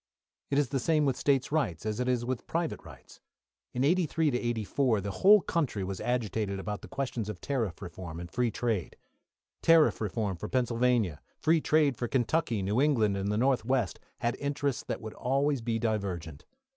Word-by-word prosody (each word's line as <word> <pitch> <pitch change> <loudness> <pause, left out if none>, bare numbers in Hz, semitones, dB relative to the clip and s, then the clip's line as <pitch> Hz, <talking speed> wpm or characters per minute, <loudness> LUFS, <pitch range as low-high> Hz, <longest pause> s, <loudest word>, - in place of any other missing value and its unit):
It 140 - +1
is 145 -3 +2
the 135 -1 0
same 155 +3 +2
with 135 -2 +1
State 135 0 +1
rights 125 - -1
as 110 +1 -2
it 125 - 0
is 120 -2 0
with 125 -1 -3
private 165 -1 -2
rights. - - -14 0.5
In 125 - -1
'83 165 0 +2
'84, 120 -1 0
the 100 +1 -4
whole 200 - +6
country 145 - -1
was 95 0 -4
agitated 110 -5 -1
about 105 +1 -4
the - - -10
questions 120 -6 -3
of 100 -4 -6
tariff 115 - -2
reform 85 -1 -7
and 85 - -6
free 125 -1 +1
trade. 110 -6 -2 0.6
Tariff 165 -6 +5
reform 105 -2 -2
for - - -6
Pennsylvania, 120 - +1 0.2
free 160 0 +3
trade 150 -5 +3
for 120 - -2
Kentucky. 120 -3 0
New 105 +7 +1
England 115 -9 +3
and 100 +1 -1
the 105 - 0
North 130 +2 +2
west 120 -7 0 0.2
had 120 +1 0
interests 140 -2 -1
that - - -3
would 110 -1 -7
always 140 +1 0
be 115 0 -1
divergent. 95 -9 -3
120 Hz, 185 wpm, -29 LUFS, 105-140 Hz, 0.6 s, whole